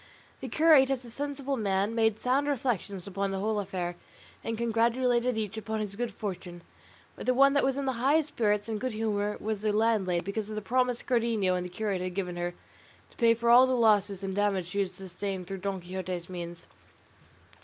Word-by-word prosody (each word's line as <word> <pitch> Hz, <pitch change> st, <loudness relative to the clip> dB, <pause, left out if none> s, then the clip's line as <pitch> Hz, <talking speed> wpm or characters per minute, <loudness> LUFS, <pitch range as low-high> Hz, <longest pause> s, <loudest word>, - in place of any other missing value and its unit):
The -, -, -6 dB
curate 305 Hz, -4 st, +5 dB
as 260 Hz, -2 st, -1 dB
a 235 Hz, -, -11 dB
sensible 280 Hz, 0 st, -3 dB
man 200 Hz, 0 st, 0 dB
made 225 Hz, -2 st, +2 dB
sound 270 Hz, +3 st, +1 dB
reflections 220 Hz, -9 st, -2 dB
upon 200 Hz, 0 st, -2 dB
the 195 Hz, -, -2 dB
whole 210 Hz, +2 st, 0 dB
affair, 180 Hz, -3 st, -3 dB, 0.5 s
and 225 Hz, 0 st, -3 dB
congratulated 235 Hz, +1 st, +1 dB
each 215 Hz, -1 st, -3 dB
upon 220 Hz, 0 st, -3 dB
his 205 Hz, -2 st, -4 dB
good 240 Hz, +1 st, -2 dB
fortune; 180 Hz, -4 st, -6 dB, 0.5 s
but -, -, -8 dB
the 255 Hz, -, +3 dB
one 275 Hz, +1 st, +6 dB
that 285 Hz, -, +3 dB
was 270 Hz, 0 st, +1 dB
in 280 Hz, -, -2 dB
the 265 Hz, -, +1 dB
highest 300 Hz, +3 st, +3 dB
spirits 210 Hz, -4 st, 0 dB
and 220 Hz, -2 st, -3 dB
good 255 Hz, -2 st, -2 dB
humour 210 Hz, -1 st, -1 dB
was 215 Hz, -1 st, -3 dB
the 215 Hz, 0 st, +1 dB
landlady, 210 Hz, -5 st, +1 dB
because 205 Hz, +2 st, -3 dB
of 215 Hz, -, -5 dB
the -, -, -1 dB
promise 250 Hz, +2 st, +1 dB
Cardenio 230 Hz, -6 st, +1 dB
and 180 Hz, 0 st, -1 dB
the 180 Hz, -, -6 dB
curate 195 Hz, 0 st, -2 dB
had 180 Hz, -1 st, -4 dB
given 180 Hz, -3 st, -2 dB
her 175 Hz, 0 st, -3 dB, 0.6 s
to -, -, -23 dB
pay 230 Hz, -1 st, +5 dB
for 235 Hz, +1 st, +2 dB
all 250 Hz, +2 st, +8 dB
the 260 Hz, -, +1 dB
losses 205 Hz, -4 st, +3 dB
and 190 Hz, -1 st, -3 dB
damage 200 Hz, -3 st, +1 dB
she 200 Hz, -, -2 dB
had 190 Hz, -2 st, -1 dB
sustained 190 Hz, 0 st, -5 dB
through 195 Hz, +2 st, -6 dB
Don 195 Hz, 0 st, -3 dB
Quixote's 180 Hz, -1 st, -5 dB
means. 175 Hz, -1 st, -7 dB
215 Hz, 210 wpm, -29 LUFS, 190-240 Hz, 0.6 s, all